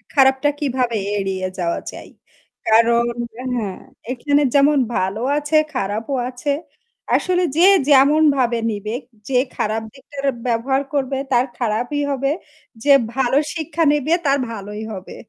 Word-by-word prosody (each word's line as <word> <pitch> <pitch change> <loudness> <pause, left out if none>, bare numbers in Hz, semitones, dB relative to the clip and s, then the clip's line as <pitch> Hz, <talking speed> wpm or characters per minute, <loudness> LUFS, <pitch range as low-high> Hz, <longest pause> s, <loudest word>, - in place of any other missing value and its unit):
খারাপটা 265 +1 +4
কীভাবে 255 -5 0 0.2
এড়িয়ে 190 -1 -2
যাওয়া 170 -1 -1
চাই - - -11 0.6
কারণ 230 +1 +4 0.5
হ্যাঁ 210 -6 -3 0.3
এখানে 285 +3 +1
যেমন 285 +1 +5 0.2
ভালো 190 +4 -1 0.2
আছে 300 +1 +1 0.2
খারাপও 220 +4 -2
আছে। 270 +3 -2 0.6
আসলে 365 0 +1
যে 350 - +6 0.2
যেমনভাবে 275 -4 +4
নিবে 210 +2 -4 0.3
যে 250 - +3 0.2
খারাপ 220 +1 -1
দিকটা 280 +1 -16 0.3
ব্যবহার 255 +4 +1
করবে 270 -1 -1 0.2
তার 245 +1 +4
খারাপই 240 +5 -1
হবে 275 +1 0 0.5
যে 285 -1 +6 0.2
ভালো 265 0 +2 0.2
শিক্ষা 325 0 -1
নিবে 295 +2 +1
তার 275 0 +3
ভালোই 210 0 -6
হবে। 185 -1 -9
260 Hz, 125 wpm, -20 LUFS, 225-285 Hz, 0.6 s, যে